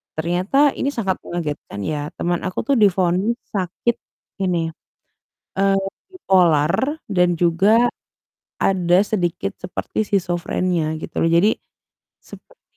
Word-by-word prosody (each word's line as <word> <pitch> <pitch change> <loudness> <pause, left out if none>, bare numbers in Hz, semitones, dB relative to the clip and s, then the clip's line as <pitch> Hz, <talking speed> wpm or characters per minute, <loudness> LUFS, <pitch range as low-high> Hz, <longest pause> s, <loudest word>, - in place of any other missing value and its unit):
ternyata 185 - +2
ini 280 - -1
sangat 195 -7 -1
mengagetkan 150 -11 -5
ya. 145 +7 -3
Teman 175 0 -1
aku 185 -1 -2
tuh 280 - +3
divonis 190 +1 +3 0.2
sakit 195 +6 -1 0.5
ini, 170 -3 0 0.9
eee, 195 0 +3 0.3
bipolar 190 - +2
dan 180 -3 +2
juga 195 +8 +4 0.7
ada 180 -1 +3
sedikit 195 0 -2
seperti 180 +4 -3
skizofrenia, 175 -3 -1
gitu - - -8
loh. 165 - +3
Jadi, 175 +6 +4 0.7
seperti, - - -16
180 Hz, 110 wpm, -21 LUFS, 170-205 Hz, 0.9 s, juga